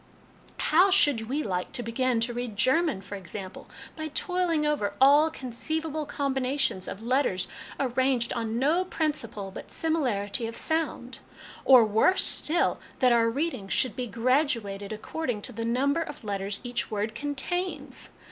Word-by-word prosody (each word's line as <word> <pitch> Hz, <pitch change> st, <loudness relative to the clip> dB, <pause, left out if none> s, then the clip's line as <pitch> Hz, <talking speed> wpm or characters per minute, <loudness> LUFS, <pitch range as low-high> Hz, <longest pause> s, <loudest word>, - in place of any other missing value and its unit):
How 360 Hz, +6 st, +4 dB
should 285 Hz, -, +3 dB
we 295 Hz, +3 st, -1 dB
like 180 Hz, -2 st, -3 dB
to 245 Hz, -, -1 dB
begin 235 Hz, +1 st, 0 dB
to 240 Hz, +1 st, +1 dB
read 240 Hz, -3 st, -5 dB
German, 265 Hz, -, +2 dB
for 200 Hz, -, -10 dB
ex 190 Hz, -5 st, -8 dB
ample, 190 Hz, -3 st, -7 dB, 0.3 s
by 315 Hz, -1 st, -4 dB
toiling 335 Hz, 0 st, 0 dB
over 295 Hz, -9 st, 0 dB
all 290 Hz, +4 st, +6 dB
conceivable 310 Hz, +3 st, -3 dB
combinations 270 Hz, -7 st, -1 dB
of 210 Hz, -, -7 dB
letters, 245 Hz, -7 st, +1 dB, 0.3 s
arranged 260 Hz, -2 st, +1 dB
on 230 Hz, -1 st, -2 dB
no 305 Hz, +8 st, +2 dB
principle 235 Hz, -, -3 dB
but -, -, -9 dB
similarity 240 Hz, -9 st, 0 dB
of 230 Hz, -, -7 dB
sound; 315 Hz, -6 st, -1 dB, 0.5 s
or, 255 Hz, -4 st, +8 dB
worse 220 Hz, -, +4 dB
still, 335 Hz, +3 st, +2 dB, 0.2 s
that 255 Hz, -1 st, +4 dB
our 230 Hz, -1 st, +4 dB
readings 255 Hz, -6 st, -2 dB
should 255 Hz, -5 st, +1 dB
be 250 Hz, -1 st, -3 dB
graduated 230 Hz, -4 st, 0 dB
according 220 Hz, 0 st, -4 dB
to -, -, -4 dB
the 230 Hz, -1 st, -4 dB
number 275 Hz, +7 st, +1 dB
of 295 Hz, -5 st, -7 dB
letters 200 Hz, -1 st, -2 dB
each 245 Hz, -1 st, -3 dB
word 215 Hz, +1 st, -2 dB
contains 290 Hz, +3 st, -3 dB
255 Hz, 150 wpm, -27 LUFS, 220-300 Hz, 0.5 s, or